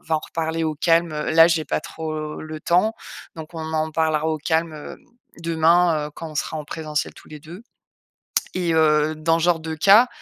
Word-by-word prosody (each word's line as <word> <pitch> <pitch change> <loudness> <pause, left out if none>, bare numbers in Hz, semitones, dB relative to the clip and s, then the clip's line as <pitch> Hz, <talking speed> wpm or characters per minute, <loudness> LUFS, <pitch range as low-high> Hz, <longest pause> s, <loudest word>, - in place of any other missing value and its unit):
va 160 - 0
en - - -3
reparler 165 +1 -3
au 155 -1 -1
calme, 165 +1 +2
heu, 150 0 -3
là, 165 +1 +7
j'ai 165 -2 +1
pas - - -1
trop 155 -1 -6
le 155 0 -7
temps, 185 +6 +2 0.4
donc 160 +1 -9
on 160 0 -5
en 155 0 0
parlera 160 -1 +1
au 160 -1 0
calme 160 +2 0
hem, 150 - -9 0.4
demain, 165 -1 +2
heu, - - -15
quand 165 - -7
on 150 - -9
sera 160 - -2
en 150 - -6
présentiel 155 -2 -3
tous - - -16
les 150 -1 -10
2.» 170 +8 -11 0.9
Et 175 -2 0
heu, 155 -1 +3
dans 165 +1 +1
ce - - 0
genre 170 -2 +2
de 160 0 -5
cas, 200 +9 +6
160 Hz, 210 wpm, -22 LUFS, 155-165 Hz, 0.9 s, là